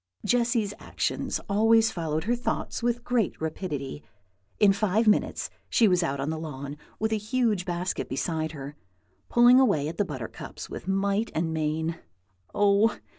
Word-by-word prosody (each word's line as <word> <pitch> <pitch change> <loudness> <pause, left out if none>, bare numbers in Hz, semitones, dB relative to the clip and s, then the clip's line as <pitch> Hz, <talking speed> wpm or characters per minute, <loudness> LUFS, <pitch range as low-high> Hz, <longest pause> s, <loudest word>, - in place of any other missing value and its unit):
Jessy's 235 -4 +1
actions - - -2
always 225 +2 +4
followed 160 -2 -2
her 235 +3 +1
thoughts 245 - -3
with 240 0 0
great 240 -5 0
rapidity. 150 - -4 0.6
In 200 -2 +6
five 215 +2 +1
minutes 210 - +2 0.2
she 225 - +4
was 180 -2 +3
out 140 -5 -1
on 140 +3 -1
the 160 - -3
lawn, 140 -2 -6 0.2
with 220 0 0
a - - +2
huge 215 -3 0
basket 180 +1 -2
beside 160 +3 -2
her, 140 0 -7 0.5
pulling 240 +2 +7
away 200 - +3
at 160 - -6
the 205 - +3
buttercups 130 -9 -7
with - - -7
might 200 +3 +1
and 160 0 0
main. 160 +1 -1 0.5
Oh! 205 +2 +3
195 Hz, 155 wpm, -27 LUFS, 155-225 Hz, 0.6 s, pulling